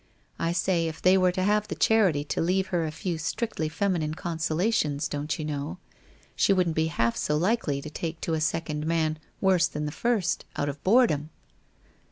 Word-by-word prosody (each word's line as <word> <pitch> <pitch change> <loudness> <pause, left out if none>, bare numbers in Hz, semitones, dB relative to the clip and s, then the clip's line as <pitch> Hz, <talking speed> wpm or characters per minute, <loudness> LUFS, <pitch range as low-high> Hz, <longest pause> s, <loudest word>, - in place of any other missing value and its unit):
I 165 0 0
say 175 -1 +1
if 160 0 -6
they 185 +1 +5
were 185 -1 +4
to 185 +1 -2
have 210 +1 +2
the - - -4
charity 190 -10 +3
to 145 - -2
leave 185 +3 +1
her 170 -4 0
a - - -4
few 165 +1 -3
strictly 165 0 -2
femi 190 +2 0
nine 155 0 -2
consolations, 160 -2 0
don't 145 +1 -3
you 155 - -4
know, 150 +4 -4 0.6
she 195 - +4
wouldn't 180 -4 +1
be 160 0 +2
half 115 -7 0
so 150 - 0
likely 165 -6 0
to 155 - -6
take 160 0 -4
to 165 - -1
a 160 - 0
second 155 0 -1
man 160 -2 0 0.2
worse 185 -3 +4
than 150 0 -4
the 150 - -3
first, 210 +1 0
out 145 - -1
of 145 0 -7
boredom. 185 - +3
165 Hz, 200 wpm, -27 LUFS, 150-185 Hz, 0.6 s, they